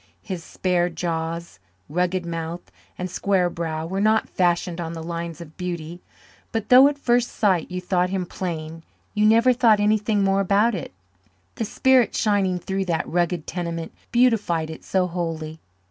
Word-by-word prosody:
His 185 -5 -5
spare 180 0 0
jaws, 165 - -4 0.3
rugged 180 +2 -1
mouth, 165 +1 -5 0.3
and 180 - -3
square 185 0 +1
brow 160 -2 -3
were 190 +4 -2
not 215 +1 +3
fashioned 175 -1 0
on 165 0 -4
the 165 -1 -6
lines 170 0 -5
of 160 -2 -11
beauty, 175 -1 -5 0.5
but 225 -2 -3
though 255 +2 +9
at 290 0 -1
first 245 -3 +2
sight 190 -7 +1
you 180 0 -3
thought 180 0 0
him 185 -1 -2
plain 165 -3 -5 0.3
you 210 0 +3
never 230 +3 +5
thought 230 -4 +4
anything 210 0 +2
more 195 0 +2
about 205 +4 +3
it 180 - -5 0.6
the 225 - -3
spirit 255 +2 +3
shining 200 -4 +1
through 190 +2 -3
that 170 -3 -1
rugged 175 -1 0
tenement 170 -2 -4 0.2
beautified 210 -10 +2
it 160 - -10
so 190 -1 +1
wholly. 165 -3 -4
180 Hz, 160 wpm, -23 LUFS, 170-205 Hz, 0.6 s, though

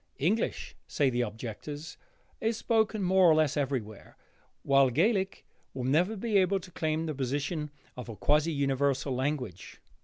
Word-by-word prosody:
English, 190 +11 -1
say 140 -3 +1
the 120 0 0
objectors, 120 +7 -6 0.4
is 225 0 0
spoken 220 -3 +1
more 185 -1 +5
or 155 - +6
less 155 -2 +2
everywhere, 130 -8 -3 0.5
while 135 -1 +4
Gaelic 190 - +1 0.3
will 130 - -3
never 165 - +2
be 210 -1 +2
able 195 +1 +2
to 185 0 -13
claim 160 0 -1
the 155 - -2
position 145 +4 -2 0.3
of 125 -1 -8
a 115 - -6
quasi 150 - +2
universal 140 -1 0
language. 125 - -3
150 Hz, 150 wpm, -29 LUFS, 130-180 Hz, 0.5 s, or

